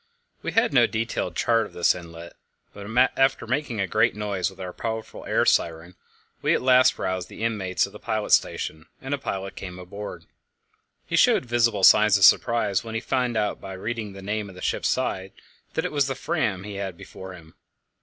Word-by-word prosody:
We -, -, -4 dB
had 225 Hz, -8 st, +2 dB
no 120 Hz, -3 st, +5 dB
detailed 110 Hz, -6 st, -3 dB
chart 115 Hz, +3 st, +2 dB
of -, -, -19 dB
this 85 Hz, -, +3 dB
inlet, 85 Hz, -1 st, -10 dB, 0.4 s
but 100 Hz, 0 st, -9 dB, 0.3 s
after 135 Hz, 0 st, +2 dB
making 135 Hz, -7 st, -2 dB
a 100 Hz, -, +1 dB
great 110 Hz, +5 st, +2 dB
noise 100 Hz, -3 st, -2 dB
with 95 Hz, 0 st, -17 dB
our 90 Hz, -1 st, -6 dB
powerful 110 Hz, -1 st, -5 dB
air -, -, +2 dB
siren, 85 Hz, +2 st, +1 dB, 0.5 s
we -, -, +2 dB
at -, -, -1 dB
last 130 Hz, 0 st, +5 dB
roused 95 Hz, -1 st, -3 dB
the -, -, -8 dB
inmates 105 Hz, -5 st, 0 dB
of -, -, -11 dB
the -, -, -10 dB
pilot 110 Hz, -1 st, -3 dB
station, 80 Hz, +2 st, +1 dB
and 135 Hz, +2 st, -4 dB
a 140 Hz, -, -1 dB
pilot 95 Hz, -7 st, -5 dB
came 90 Hz, -2 st, -7 dB
aboard. 100 Hz, +3 st, -8 dB, 0.8 s
He -, -, -2 dB
showed -, -, +4 dB
visible 115 Hz, -4 st, +1 dB
signs 105 Hz, +1 st, +7 dB
of 100 Hz, -, 0 dB
surprise 105 Hz, -4 st, +4 dB
when 115 Hz, -1 st, -7 dB
he -, -, +1 dB
found 125 Hz, -1 st, -1 dB
out, 105 Hz, -1 st, -1 dB
by 95 Hz, -, -7 dB
reading 110 Hz, +1 st, -5 dB
the 95 Hz, 0 st, -10 dB
name 105 Hz, 0 st, -3 dB
on 95 Hz, -, -13 dB
the 90 Hz, -, -11 dB
ship's -, -, 0 dB
side, 95 Hz, 0 st, -2 dB, 0.4 s
that -, -, 0 dB
it -, -, -2 dB
was 145 Hz, -2 st, +1 dB
the 135 Hz, -, -2 dB
Fram 125 Hz, -, -1 dB
he 100 Hz, -1 st, -7 dB
had 95 Hz, -3 st, -5 dB
before 95 Hz, +1 st, -10 dB
him. 80 Hz, -3 st, -14 dB
105 Hz, 205 wpm, -25 LUFS, 95-115 Hz, 0.8 s, signs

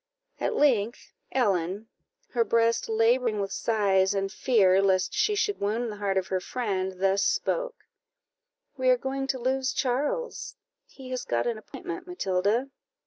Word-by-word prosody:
At -, -, -1 dB
length, 240 Hz, -6 st, +1 dB, 0.2 s
Ellen, 200 Hz, -4 st, 0 dB, 0.4 s
her 235 Hz, -2 st, +2 dB
breast 230 Hz, +1 st, +1 dB
labouring 225 Hz, 0 st, +2 dB
with 195 Hz, -1 st, -2 dB
sighs, 200 Hz, -3 st, +2 dB
and 195 Hz, 0 st, -1 dB
fear 195 Hz, -7 st, +3 dB
lest 190 Hz, -2 st, +2 dB
she 420 Hz, -, +2 dB
should 410 Hz, 0 st, 0 dB
wound 220 Hz, +3 st, -1 dB
the 210 Hz, -, -8 dB
heart 200 Hz, -2 st, -1 dB
of 190 Hz, -, +1 dB
her 185 Hz, -, 0 dB
friend, 190 Hz, -3 st, -2 dB
thus 195 Hz, +1 st, +2 dB
spoke: -, -, -1 dB, 0.9 s
"We 260 Hz, -2 st, +1 dB
are 255 Hz, -, +5 dB
going 270 Hz, +2 st, -3 dB
to 265 Hz, -, -1 dB
lose 260 Hz, +1 st, 0 dB
Charles: 460 Hz, -, -2 dB, 0.3 s
he 260 Hz, -2 st, -11 dB
has 255 Hz, -1 st, -3 dB
got 120 Hz, 0 st, -1 dB
an 230 Hz, -2 st, -1 dB
appointment, 360 Hz, -, -8 dB
Matilda." 225 Hz, -, 0 dB
230 Hz, 150 wpm, -27 LUFS, 195-260 Hz, 0.9 s, are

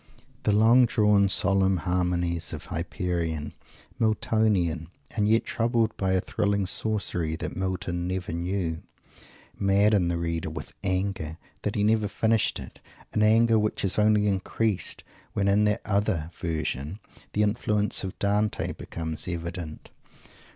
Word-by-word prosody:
The -, -, +1 dB
long 115 Hz, +4 st, +6 dB
drawn 105 Hz, -3 st, +3 dB
solemn 95 Hz, -1 st, +3 dB
harmonies 85 Hz, -1 st, 0 dB
of -, -, -6 dB
"Hyperion" 85 Hz, -2 st, -3 dB, 0.5 s
Miltonian, 105 Hz, -7 st, +1 dB, 0.2 s
and 105 Hz, -2 st, 0 dB
yet 115 Hz, +1 st, +3 dB
troubled 115 Hz, -1 st, 0 dB
by 95 Hz, -1 st, 0 dB
a 95 Hz, -, +3 dB
thrilling 100 Hz, +1 st, 0 dB
sorcery 90 Hz, -5 st, 0 dB
that -, -, -5 dB
Milton 95 Hz, -2 st, -2 dB
never 90 Hz, -2 st, -3 dB
knew 85 Hz, -1 st, -2 dB, 0.8 s
madden 100 Hz, -1 st, +3 dB
the 85 Hz, 0 st, 0 dB
reader 85 Hz, -1 st, -2 dB
with -, -, -7 dB
anger 95 Hz, -4 st, -2 dB, 0.2 s
that 105 Hz, -, -2 dB
he 105 Hz, -, +1 dB
never 110 Hz, 0 st, +3 dB
finished 110 Hz, +2 st, +1 dB
it; -, -, -10 dB, 0.3 s
an 105 Hz, -, +1 dB
anger 110 Hz, +1 st, +5 dB
which 105 Hz, -1 st, -1 dB
is 95 Hz, -, +1 dB
only 105 Hz, 0 st, +4 dB
increased 100 Hz, +1 st, -1 dB, 0.3 s
when 100 Hz, -1 st, 0 dB
in 100 Hz, +2 st, +4 dB
that 105 Hz, +1 st, +1 dB
other 100 Hz, -6 st, 0 dB
"Version," 80 Hz, 0 st, -3 dB, 0.4 s
the 105 Hz, -, +2 dB
influence 105 Hz, -1 st, +1 dB
of 95 Hz, -, -5 dB
Dante 105 Hz, +1 st, 0 dB
becomes 80 Hz, 0 st, -4 dB
evident. 85 Hz, -2 st, -5 dB
95 Hz, 135 wpm, -26 LUFS, 85-105 Hz, 0.8 s, long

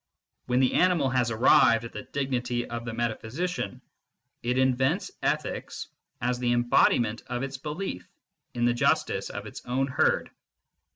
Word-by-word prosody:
When 125 Hz, 0 st, +2 dB
the 130 Hz, -1 st, +3 dB
animal 175 Hz, -7 st, +3 dB
has 125 Hz, -2 st, +2 dB
arrived 115 Hz, 0 st, +5 dB
at 115 Hz, -, -8 dB
the 105 Hz, -, -5 dB
dignity 125 Hz, -3 st, -2 dB
of 120 Hz, 0 st, -5 dB
the 115 Hz, -, -4 dB
meta 120 Hz, -1 st, 0 dB
physician, 145 Hz, -, -4 dB, 0.6 s
it 125 Hz, +2 st, -1 dB
invents 130 Hz, 0 st, +1 dB
ethics -, -, -2 dB, 0.3 s
as 125 Hz, +1 st, 0 dB
the 120 Hz, -1 st, +1 dB
embodiment 120 Hz, -1 st, +3 dB
of 125 Hz, +1 st, -3 dB
its 135 Hz, 0 st, -4 dB
belief 150 Hz, -, -5 dB, 0.5 s
in 120 Hz, 0 st, +1 dB
the 120 Hz, -, +3 dB
justice 120 Hz, -, +1 dB
of -, -, -6 dB
its -, -, -9 dB
own 130 Hz, +2 st, 0 dB
herd. 130 Hz, -, +1 dB
125 Hz, 155 wpm, -27 LUFS, 120-130 Hz, 0.6 s, arrived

